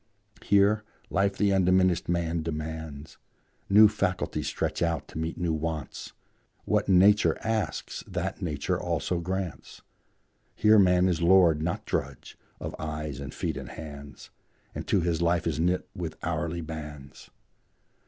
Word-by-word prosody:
Here, 100 +2 +3 0.3
life 100 +1 +1
the 100 -1 +2
undiminished 90 -2 +3
man 85 -1 0
demands; 80 -2 -6 0.5
New 105 +2 +8
faculties 100 -3 -2
stretch - - -2
out 85 -4 0
to - - -9
meet 80 +1 -3
new 85 -2 0
wants; 80 -2 -4 0.5
What - - +1
Nature 100 +3 +5
asks, 110 -2 -2
that 95 +2 -4
Nature 75 -6 -1
also 90 - -1
grants; 95 0 -5 0.7
Here 110 0 +5
man 90 -1 +4
is 85 -3 0
lord, 85 -3 +5
not 85 +2 -2
drudge, - - -4 0.2
of - - -5
eyes 75 -3 -4
and 70 -1 -6
feet 80 -1 -3
and 65 -2 -7
hands, 75 -2 -10 0.4
And - - -6
to 95 - +2
his 85 -1 0
life 85 -1 +1
is 80 -2 -1
knit 90 +2 +1
with 85 -3 -5
hourly 85 0 -2
bands. 75 -3 -9
85 Hz, 140 wpm, -27 LUFS, 80-95 Hz, 0.7 s, New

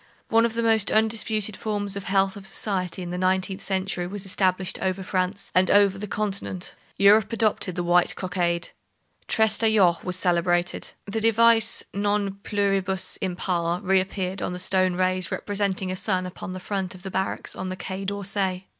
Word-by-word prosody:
One 230 +1 +4
of 225 - -8
the 235 - 0
most 220 -2 +3
undisputed 220 -1 +1
forms 205 -2 -1
of 200 - -6
the - - -5
health 195 0 +2
of 195 -1 -9
society 185 -3 -3
in 175 - -6
the 180 - -3
nineteenth 185 +1 0
century 190 -2 -2
was 200 +1 -6
established 185 -1 0
over 190 0 -1
France, 185 +1 -2
and 185 +1 +3
over 200 -1 +4
the 210 - -5
continent. 200 -3 -3 0.2
Europe 205 +1 +5
adopted 215 -5 0
the 175 - -1
white 175 0 +3
cockade. 175 -2 -1 0.6
Trestaillon 220 -5 +4
was 180 -1 -1
celebrated. 175 0 0
The 220 +2 -3
device 225 0 +4
non 200 -1 -1
pluribus 195 -2 +1
impar 175 -2 -1
reappeared 190 -1 0
on 180 - -2
the - - -5
stone 185 0 +1
rays 185 -1 0
representing 200 -2 -2
a - - -3
sun 185 -1 -1
upon 185 +1 -7
the 185 - -6
front 190 -1 -4
of 185 - -14
the 190 - -6
barracks 190 +1 -3
on 185 - -5
the 185 - -5
Quai 190 +1 -5
d'Orsay. 195 -1 -2
190 Hz, 170 wpm, -24 LUFS, 185-205 Hz, 0.6 s, Europe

